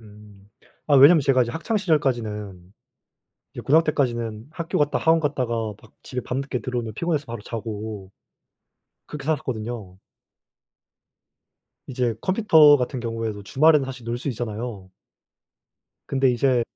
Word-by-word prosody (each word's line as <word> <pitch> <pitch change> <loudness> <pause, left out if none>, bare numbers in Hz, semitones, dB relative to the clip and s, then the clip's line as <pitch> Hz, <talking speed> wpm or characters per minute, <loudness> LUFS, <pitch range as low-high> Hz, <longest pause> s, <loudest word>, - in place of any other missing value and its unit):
음. 105 -2 -17 0.4
아 145 - +3
왜냐면 150 +5 +8
제가 135 -2 +3
이제 120 - -3
학창 170 - -2
시절까지는 110 - -2 0.8
이제 - - -7
고등학 160 +4 +4
때까지는 120 -7 -2
학교 165 0 -3
갔다 150 0 +1
학원 165 0 +3
갔다가 120 -7 -2
막 110 - -19
집에 125 -1 -5
밤늦게 130 0 -3
들어오면 120 -4 -4
피곤해서 155 +2 -2
바로 115 -2 -6
자고 110 -3 -6 1.0
그렇게 150 -2 -8
살았거든요. 120 -9 -4 1.9
이제 125 -3 -1
컴퓨터 160 -7 +5
같은 125 -1 -3
경우에도 115 -3 -4
주말에는 150 +5 +3
사실 130 -2 -8
놀 115 +1 -3
수 135 - -5
있잖아요. 110 -5 -5 1.1
근데 135 -1 +2
이제 125 0 +2
125 Hz, 310 characters per minute, -23 LUFS, 110-145 Hz, 1.9 s, 왜냐면